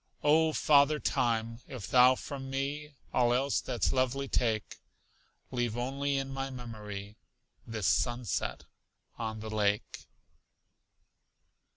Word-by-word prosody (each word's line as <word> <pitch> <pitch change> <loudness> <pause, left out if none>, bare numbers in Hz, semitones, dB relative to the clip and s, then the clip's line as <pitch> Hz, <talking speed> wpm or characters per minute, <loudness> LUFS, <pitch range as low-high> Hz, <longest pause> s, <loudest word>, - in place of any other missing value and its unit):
Oh, 155 +2 +5
Father 150 0 +4
Time, 115 -3 0
if 115 -8 -7
thou 125 +2 +6
from 135 0 -7
me 140 +2 -3 0.2
All 120 -1 +3
else 135 +2 +1
that's 125 -2 0
lovely 130 +1 0
take, 110 -5 0 0.7
Leave 120 -3 -1
only 140 +3 -1
in 135 0 -2
my 135 0 -3
memory 105 -5 -7 0.5
This 110 -4 -3
sunset 120 +1 0 0.5
on 110 -2 -3
the 110 0 -6
lake. 105 -1 -1
125 Hz, 110 wpm, -31 LUFS, 110-135 Hz, 0.7 s, thou